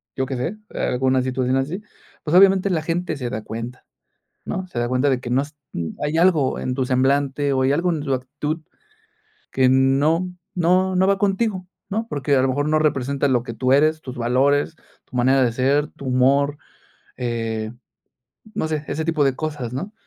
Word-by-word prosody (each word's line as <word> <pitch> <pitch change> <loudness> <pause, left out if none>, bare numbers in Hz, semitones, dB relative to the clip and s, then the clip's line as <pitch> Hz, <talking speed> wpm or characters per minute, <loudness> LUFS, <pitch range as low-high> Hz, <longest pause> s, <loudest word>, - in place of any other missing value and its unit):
yo 130 - -1
qué 135 0 -4
sé, 165 +12 -3
eh, - - -8
alguna 130 +1 +1
situación 130 0 0
así. 150 +10 -2 0.4
Pues, 155 +2 0
obviamente, 195 +1 +6
la 170 -4 0
gente 170 0 -2
se 125 -3 -3
da 110 -1 -4
cuenta, 115 +3 -7 0.6
¿no? 185 0 -4
Se 125 - -6
da 120 0 0
cuenta 130 +3 +1
de 130 -2 0
que 120 - -6
no 130 +2 +2
s 150 +2 -10 0.5
hay 150 +2 0
algo 165 -7 +3
en 125 - -2
tu 130 0 0
semblante 140 +2 +1
o 130 - +1
hay 130 +1 +3
algo 170 +5 +1
en 160 -3 -1
tu 140 -2 -2
actitud 145 +5 -4 0.9
que 130 -1 +3
no 135 +7 +3 0.3
no 185 +2 +2
no 190 +1 +4
va 195 0 +2
contigo, 195 -1 0 0.2
¿no? 220 +3 -2
Porque, 145 - 0
a 130 - +3
lo 135 - +2
mejor, 145 +3 0
no 155 0 +3
representa 140 -2 +1
lo 125 -3 +2
que 115 - -6
tú 130 +2 +1
eres, 155 +3 +3
tus 130 0 -8
valores, 135 +6 +2 0.3
tu 130 - -9
manera 130 +2 +4
de 120 - +1
ser, 140 +5 +1
tu 140 - -10
humor, 140 +3 +2 0.6
eh, 115 -3 -3 0.8
no 160 - -1
sé, 155 -1 -2
ese 160 +3 -2
tipo 155 -2 +1
de 135 -1 +2
cosas, 150 -7 -4
¿no? 180 +12 -5
140 Hz, 195 wpm, -22 LUFS, 130-160 Hz, 0.9 s, obviamente